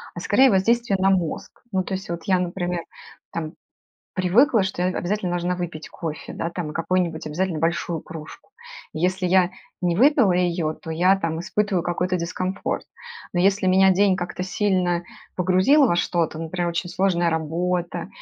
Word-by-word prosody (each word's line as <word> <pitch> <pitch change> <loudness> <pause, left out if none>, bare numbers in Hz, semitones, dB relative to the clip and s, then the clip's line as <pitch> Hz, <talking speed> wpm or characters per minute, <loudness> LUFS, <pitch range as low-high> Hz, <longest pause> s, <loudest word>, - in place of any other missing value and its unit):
а - - -5
скорее 265 0 +5
воздействие 230 +2 +2
на 190 +1 +3
мозг. 180 -4 -2
Ну, 185 - +1
то 190 - -5
есть 190 +1 -6
вот, 170 -1 -4
я, 185 -2 +2
например, 175 -1 -2 0.5
там, 160 -2 -4 0.6
привыкла, 210 +6 +4
что 190 -1 -3
я, 180 - +2
э, - - -6
обязательно 190 0 -1
должна 175 +1 -1
выпить 170 -4 -5
кофе, 160 -2 -6
да, 165 - -3
там 170 -3 -5
и - - -7
какую-нибудь 170 -2 -1
обязательно 170 +2 -1
большую 165 0 -1
кружку. 160 - -11 0.4
Если 180 +3 0
я 180 0 +4 0.3
не 175 -1 +2
выпила 255 - +4
ее, 175 -3 0
то 160 - -8
я, 180 +4 +3
там, 165 -3 -2
испытываю 200 0 0
какой-то 180 +1 -1
дискомфорт. 185 +3 -3 0.5
Но 175 - +2
если 195 +1 +2
меня 190 +1 +5
день 195 0 +3
как-то 180 0 -4
сильно 185 -2 0 0.3
погрузил 185 - +4
во 175 - +1
что-то, 170 -2 0
например, 170 +2 -2
очень 170 +1 -3
сложная 175 -2 +1
работа 170 +2 -2
180 Hz, 170 wpm, -23 LUFS, 170-190 Hz, 0.6 s, скорее